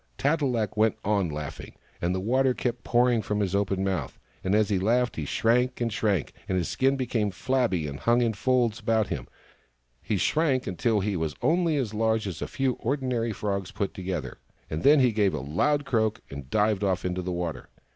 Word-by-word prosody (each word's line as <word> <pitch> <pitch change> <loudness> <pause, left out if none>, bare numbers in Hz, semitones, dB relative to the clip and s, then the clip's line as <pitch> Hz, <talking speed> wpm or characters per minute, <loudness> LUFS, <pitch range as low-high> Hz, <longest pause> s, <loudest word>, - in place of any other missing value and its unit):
Tat 150 +3 +1
e - - +2
lak 115 -6 -1
went 110 0 +2
on 100 -4 +1
laughing, 75 -1 -7 0.3
and 90 +2 0
the - - -1
water 130 +5 +2
kept 120 -1 -3
pouring 120 -1 +3
out - - -7
of 105 0 0
his 100 -3 0
open 100 -1 0
mouth; 95 -2 -2 0.3
and 95 +2 +1
as 110 -1 +3
he 100 -3 +1
laughed 120 +5 +1
he 80 - -3
shrank 125 - +1
and 115 -2 -1
shrank, 100 -7 0 0.2
and 95 - +1
his 90 - 0
skin 135 +1 +1
became 115 -5 0
flabby 110 -4 0
and 70 -1 -5
hung 120 +1 +3
in 115 -2 +1
folds 120 0 +1
about 110 -1 +1
him. - - -4 0.7
He 105 - -1
shrank 140 - +1
until 105 +2 0
he 100 0 -1
was 80 -3 -2
only 165 -1 +2
as 120 -6 -2
large 110 0 +1
as 90 -5 -5
a - - -2
few 135 -1 0
ordinary 125 -3 -1
frogs 100 -2 -3
put 100 - -3
together: 90 -8 -4 0.3
and 80 - -2
then 145 0 +6
he 125 -2 +4
gave 105 -3 +1
a - - -2
loud 140 - 0
croak, 110 -3 0
and 70 -2 -8
dived 105 +2 +1
off 95 -2 0
into 90 0 -1
the 90 0 -3
water. 85 -2 -4
110 Hz, 210 wpm, -27 LUFS, 95-125 Hz, 0.7 s, then